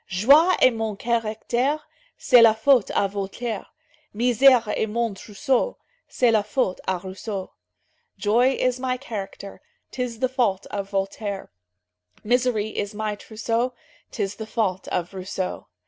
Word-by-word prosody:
"Joie 280 Hz, -, +5 dB
est 255 Hz, -, +6 dB
mon 225 Hz, -2 st, -3 dB
caractère, 235 Hz, +6 st, -1 dB, 0.4 s
C'est 245 Hz, -3 st, +6 dB
la 225 Hz, -1 st, +7 dB
faute 245 Hz, 0 st, +4 dB
à 200 Hz, -, +3 dB
Voltaire; 200 Hz, +3 st, -4 dB, 0.5 s
Misère 245 Hz, +1 st, +5 dB
est -, -, 0 dB
mon 230 Hz, 0 st, -1 dB
trousseau, 245 Hz, -, -1 dB, 0.3 s
C'est 245 Hz, -2 st, +2 dB
la 220 Hz, -2 st, +3 dB
faute 210 Hz, -2 st, -1 dB
à 190 Hz, -, +1 dB
Rousseau." 190 Hz, +1 st, -6 dB, 0.7 s
"Joy 240 Hz, +5 st, +3 dB
is 255 Hz, 0 st, 0 dB
my 255 Hz, 0 st, -1 dB
character, 200 Hz, -6 st, -7 dB, 0.3 s
'Tis 250 Hz, -3 st, -4 dB
the 255 Hz, +3 st, +1 dB
fault 235 Hz, -7 st, 0 dB
of 200 Hz, -1 st, -4 dB
Voltaire; 195 Hz, 0 st, -3 dB, 0.7 s
Misery 240 Hz, -2 st, +1 dB
is 205 Hz, -1 st, -4 dB
my 215 Hz, 0 st, -2 dB
trousseau, 230 Hz, +4 st, -2 dB, 0.4 s
'Tis 200 Hz, -2 st, -3 dB
the 220 Hz, -, -6 dB
fault 195 Hz, -5 st, -1 dB
of 175 Hz, +1 st, -3 dB
Rousseau." 185 Hz, 0 st, -4 dB
220 Hz, 135 wpm, -24 LUFS, 200-250 Hz, 0.7 s, la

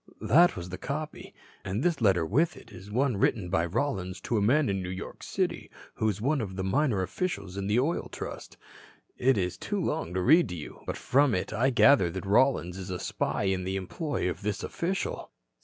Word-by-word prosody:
That 175 Hz, +4 st, +5 dB
was 90 Hz, 0 st, -6 dB
the 95 Hz, +1 st, -6 dB
copy. 150 Hz, +3 st, -5 dB, 0.3 s
And 100 Hz, +7 st, -2 dB
this 170 Hz, -7 st, +1 dB
letter 95 Hz, -6 st, +3 dB
with 155 Hz, -, +1 dB
it -, -, -14 dB
is 100 Hz, -, -11 dB
one 125 Hz, +1 st, +1 dB
written 95 Hz, -3 st, +1 dB
by 85 Hz, -2 st, +2 dB
Rollins 95 Hz, -, -2 dB
to 120 Hz, -, -2 dB
a 105 Hz, -, +2 dB
man 135 Hz, +8 st, +3 dB
in 95 Hz, -1 st, -1 dB
New 90 Hz, -, -5 dB
York 95 Hz, +1 st, -7 dB
City -, -, -2 dB, 0.2 s
who 110 Hz, -, 0 dB
is 100 Hz, -1 st, -3 dB
one 140 Hz, +5 st, +1 dB
of 95 Hz, -4 st, -5 dB
the 95 Hz, -, -3 dB
minor 110 Hz, -1 st, +1 dB
officials 100 Hz, -, -3 dB
of 100 Hz, 0 st, -3 dB
the 105 Hz, +4 st, +3 dB
Oil 155 Hz, +7 st, -1 dB
Trust. -, -, -7 dB, 0.6 s
It 130 Hz, -2 st, +3 dB
is 90 Hz, -2 st, -1 dB
too -, -, -2 dB
long 85 Hz, -, -2 dB
to 95 Hz, -, +1 dB
read 160 Hz, -, +5 dB
to 90 Hz, -, -4 dB
you. 75 Hz, -, -8 dB
But -, -, -3 dB
from 140 Hz, -2 st, +3 dB
it 90 Hz, -, -2 dB
I 125 Hz, +4 st, +2 dB
gather 110 Hz, -5 st, +5 dB
that 95 Hz, +3 st, -6 dB
Rollins 100 Hz, -4 st, +2 dB
is 95 Hz, 0 st, -7 dB
a 90 Hz, -, -2 dB
spy -, -, -2 dB
in 95 Hz, -1 st, 0 dB
the 95 Hz, +1 st, -2 dB
employ 95 Hz, -, -2 dB
of 90 Hz, -, -3 dB
this 105 Hz, 0 st, -2 dB
official." 195 Hz, -, -3 dB
105 Hz, 215 wpm, -28 LUFS, 95-140 Hz, 0.6 s, That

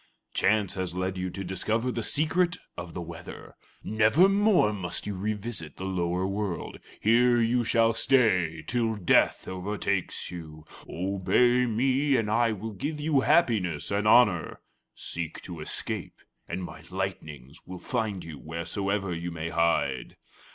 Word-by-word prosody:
Chance 105 Hz, -2 st, +2 dB
has 90 Hz, -2 st, -3 dB
led 95 Hz, +1 st, -2 dB
you 90 Hz, 0 st, -3 dB
to 95 Hz, +2 st, -6 dB
discover 110 Hz, +7 st, -1 dB
the 120 Hz, -, -3 dB
secret 165 Hz, +7 st, +1 dB, 0.2 s
of 85 Hz, -1 st, -8 dB
the 90 Hz, -, -4 dB
weather. 85 Hz, +1 st, -10 dB, 0.3 s
Nevermore 175 Hz, -, +4 dB
must 90 Hz, -4 st, -3 dB
you 105 Hz, -, -3 dB
revisit 100 Hz, -5 st, -4 dB
the -, -, -6 dB
lower 90 Hz, -1 st, -1 dB
world. 95 Hz, -3 st, -3 dB, 0.2 s
Here 120 Hz, +1 st, +4 dB, 0.2 s
shall 115 Hz, 0 st, +3 dB
you -, -, 0 dB
stay 95 Hz, -11 st, +2 dB
till 115 Hz, -2 st, 0 dB
Death 100 Hz, -5 st, +2 dB
overtakes 95 Hz, 0 st, -2 dB
you. 80 Hz, -3 st, -9 dB, 0.2 s
Obey 100 Hz, +7 st, +2 dB
me, 130 Hz, +5 st, +2 dB
and 110 Hz, -4 st, 0 dB
I 115 Hz, +1 st, +3 dB
will 110 Hz, +1 st, -5 dB
give 150 Hz, +10 st, -4 dB
you 150 Hz, -1 st, +2 dB
happiness 105 Hz, -, +2 dB
and 100 Hz, +1 st, +1 dB
honor; 105 Hz, -7 st, +4 dB, 0.3 s
seek 85 Hz, -1 st, -3 dB
to 85 Hz, -3 st, -8 dB
escape, 75 Hz, -, -4 dB, 0.3 s
and 95 Hz, -, -4 dB
my 90 Hz, -2 st, -8 dB
lightnings 80 Hz, -8 st, -5 dB
will 90 Hz, 0 st, -7 dB
find 110 Hz, -3 st, -2 dB
you 80 Hz, -3 st, -9 dB
wheresoever 95 Hz, +4 st, -2 dB
you 85 Hz, +1 st, -4 dB
may 85 Hz, -1 st, -4 dB
hide." 85 Hz, -6 st, 0 dB
100 Hz, 145 wpm, -27 LUFS, 85-115 Hz, 0.3 s, Nevermore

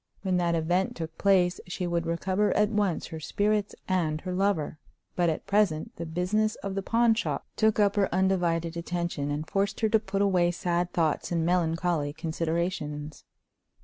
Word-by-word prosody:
When 185 Hz, -2 st, +1 dB
that 170 Hz, -1 st, +1 dB
event 175 Hz, +4 st, 0 dB
took 160 Hz, -1 st, -6 dB
place 185 Hz, -2 st, +3 dB
she 180 Hz, 0 st, -3 dB
would 170 Hz, -1 st, -1 dB
recover 185 Hz, +5 st, +1 dB
at 210 Hz, +1 st, +3 dB
once 205 Hz, -5 st, 0 dB
her 160 Hz, -, -7 dB
spirits 205 Hz, +5 st, 0 dB
and 165 Hz, -5 st, 0 dB
her 185 Hz, -1 st, -4 dB
lover; 180 Hz, -5 st, 0 dB, 0.4 s
but 175 Hz, -1 st, +2 dB
at 155 Hz, -, -3 dB
present 200 Hz, -7 st, +1 dB
the 170 Hz, -, -5 dB
business 195 Hz, +6 st, 0 dB
of 195 Hz, -, -3 dB
the 195 Hz, -, -2 dB
pawn 230 Hz, +3 st, +3 dB
shop 230 Hz, -, -2 dB
took 220 Hz, -1 st, +2 dB
up 205 Hz, 0 st, +3 dB
her 195 Hz, -2 st, +3 dB
undivided 175 Hz, -3 st, +1 dB
attention, 170 Hz, -4 st, -3 dB
and 150 Hz, +2 st, -3 dB
forced 200 Hz, +1 st, -1 dB
her 220 Hz, -, +3 dB
to 220 Hz, 0 st, +4 dB
put 200 Hz, -1 st, -1 dB
away 180 Hz, -3 st, +3 dB
sad 175 Hz, 0 st, -1 dB
thoughts 160 Hz, -1 st, 0 dB
and 165 Hz, -2 st, +1 dB
melancholy 165 Hz, -3 st, +1 dB
considerations. 160 Hz, -2 st, -3 dB
180 Hz, 175 wpm, -28 LUFS, 165-195 Hz, 0.4 s, to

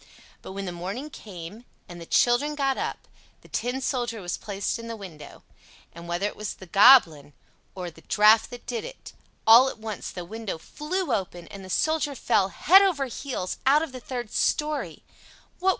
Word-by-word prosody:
But -, -, -9 dB
when 195 Hz, 0 st, -5 dB
the 180 Hz, -, -4 dB
morning 195 Hz, -, -6 dB
came, 200 Hz, -1 st, -10 dB, 0.2 s
and 175 Hz, -1 st, -10 dB
the 165 Hz, -, -10 dB
children 280 Hz, +5 st, +2 dB
got 275 Hz, -2 st, +1 dB
up, -, -, -4 dB, 0.3 s
the -, -, -18 dB
Tin 250 Hz, +2 st, -2 dB
Soldier 240 Hz, -3 st, -2 dB
was 175 Hz, -2 st, -3 dB
placed 200 Hz, +2 st, -3 dB
in 230 Hz, -, -8 dB
the 230 Hz, -, -5 dB
window; 180 Hz, -8 st, -11 dB, 0.5 s
and 170 Hz, +1 st, -10 dB
whether 175 Hz, +3 st, -1 dB
it 205 Hz, -, -3 dB
was 210 Hz, -2 st, -5 dB
the 190 Hz, -, -12 dB
Goblin 180 Hz, -, +6 dB, 0.4 s
or 180 Hz, -2 st, -5 dB
the -, -, -17 dB
draft 215 Hz, +1 st, +4 dB
that 245 Hz, -, -10 dB
did 240 Hz, -2 st, -4 dB
it, -, -, -10 dB, 0.3 s
all 235 Hz, +4 st, +8 dB
at -, -, -8 dB
once 220 Hz, -1 st, -6 dB
the 180 Hz, -2 st, -7 dB
window 220 Hz, -1 st, -5 dB
flew 300 Hz, -, -3 dB
open, 175 Hz, -4 st, -3 dB
and 195 Hz, -1 st, -10 dB
the 185 Hz, -, -11 dB
Soldier 310 Hz, -, 0 dB
fell, 205 Hz, -5 st, +2 dB
head 365 Hz, -, +6 dB
over 350 Hz, -9 st, +2 dB
heels, 250 Hz, -7 st, -5 dB
out 295 Hz, +3 st, +5 dB
of 320 Hz, -, -6 dB
the 255 Hz, -, -8 dB
third 245 Hz, -3 st, -6 dB
story. 300 Hz, 0 st, -1 dB
225 Hz, 185 wpm, -26 LUFS, 185-270 Hz, 0.5 s, all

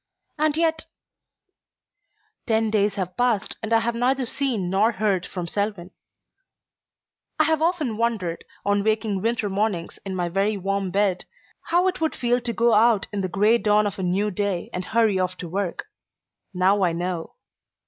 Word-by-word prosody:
And 305 Hz, 0 st, +2 dB
yet 320 Hz, -1 st, +1 dB, 1.6 s
Ten 220 Hz, -1 st, +1 dB
days 205 Hz, -2 st, +2 dB
have 185 Hz, -3 st, -4 dB
passed 235 Hz, -3 st, 0 dB
and 220 Hz, 0 st, -5 dB
I 225 Hz, 0 st, +4 dB
have 235 Hz, +1 st, -1 dB
neither 255 Hz, +3 st, +1 dB
seen 235 Hz, -7 st, -1 dB
nor 205 Hz, +5 st, +2 dB
heard 200 Hz, -4 st, 0 dB
from 180 Hz, -2 st, -5 dB
Selwyn. 200 Hz, -1 st, -3 dB, 1.5 s
I -, -, +6 dB
have 320 Hz, -1 st, +1 dB
often 320 Hz, -10 st, 0 dB
wondered, 215 Hz, -8 st, -1 dB, 0.2 s
on 205 Hz, 0 st, +2 dB
waking 215 Hz, -2 st, 0 dB
winter 225 Hz, 0 st, 0 dB
mornings 195 Hz, -3 st, -2 dB
in 195 Hz, -1 st, -4 dB
my 175 Hz, -1 st, -1 dB
very 195 Hz, +4 st, 0 dB
warm 195 Hz, 0 st, -1 dB
bed, 195 Hz, -1 st, 0 dB, 0.4 s
how 350 Hz, +2 st, +3 dB
it 370 Hz, -3 st, -2 dB
would 320 Hz, -, 0 dB
feel 245 Hz, 0 st, +1 dB
to 240 Hz, 0 st, -2 dB
go 235 Hz, 0 st, +2 dB
out 220 Hz, -1 st, +4 dB
in 200 Hz, -, -1 dB
the 185 Hz, -, -2 dB
gray 210 Hz, +6 st, +3 dB
dawn 210 Hz, -1 st, +3 dB
of 200 Hz, -1 st, -3 dB
a -, -, -2 dB
new 190 Hz, +4 st, 0 dB
day 200 Hz, -2 st, -2 dB
and 180 Hz, 0 st, -3 dB
hurry 220 Hz, -3 st, +2 dB
off 185 Hz, 0 st, -1 dB
to 175 Hz, -, -6 dB
work. 185 Hz, +1 st, -3 dB, 0.7 s
Now 190 Hz, +2 st, +2 dB
I 175 Hz, -2 st, +2 dB
know. 175 Hz, -1 st, -4 dB
205 Hz, 170 wpm, -24 LUFS, 185-235 Hz, 1.6 s, I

